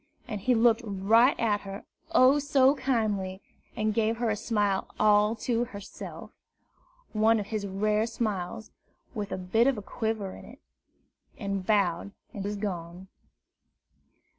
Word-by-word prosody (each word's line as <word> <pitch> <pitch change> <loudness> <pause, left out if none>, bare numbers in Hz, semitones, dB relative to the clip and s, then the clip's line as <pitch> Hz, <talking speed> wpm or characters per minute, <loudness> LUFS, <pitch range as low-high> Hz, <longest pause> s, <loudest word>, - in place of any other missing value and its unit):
And 210 -4 -5
he 250 +4 +2
looked 230 0 +4
right 220 +5 +3
at 210 -3 +1
her, 195 +1 -8 0.3
oh, 280 -3 +5
so 280 -2 +4
kindly! 215 -9 -1 0.4
and 215 0 0
gave 225 +1 +1
her 235 -1 0
a - - 0
smile 210 -3 0
all 210 +1 +4
to 240 -1 +1
herself 205 -4 -9 0.8
one 220 +1 +3
of 205 - -3
his 205 -2 -2
rare 210 +3 0
smiles, 215 -3 -3 0.4
with 205 -4 -4
a - - -2
bit 205 +7 +2
of 270 -4 +2
a 210 - -6
quiver 220 -3 -3
in - - -12
it, - - -14 0.8
and 195 -2 -3
bowed, 200 -2 +1 0.2
and 200 - -5
was 205 +1 -3
gone. 185 -2 -5
215 Hz, 145 wpm, -28 LUFS, 200-230 Hz, 0.8 s, oh